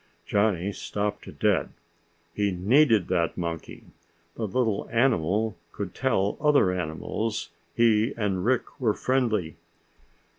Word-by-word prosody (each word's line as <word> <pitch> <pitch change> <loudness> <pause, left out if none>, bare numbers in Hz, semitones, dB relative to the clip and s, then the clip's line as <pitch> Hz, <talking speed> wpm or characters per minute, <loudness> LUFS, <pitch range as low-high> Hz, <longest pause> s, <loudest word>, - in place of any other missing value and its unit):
Johnny 100 -2 +1
stopped 105 +1 -4
dead. - - +2 0.6
He 105 +1 +1
needed 110 - +3
that 85 -3 0
monkey. 85 -2 -5 0.5
The 110 - -3
little 110 0 -1
animal 110 -3 +1 0.2
could 100 -3 -5
tell 105 -7 0
other 145 -10 +4
animals 90 +6 -3 0.3
he 115 +1 +3
and 100 -4 -1
Rick 130 +4 -1
were 110 -4 +2
friendly. 115 -10 0
105 Hz, 110 wpm, -26 LUFS, 90-115 Hz, 0.6 s, other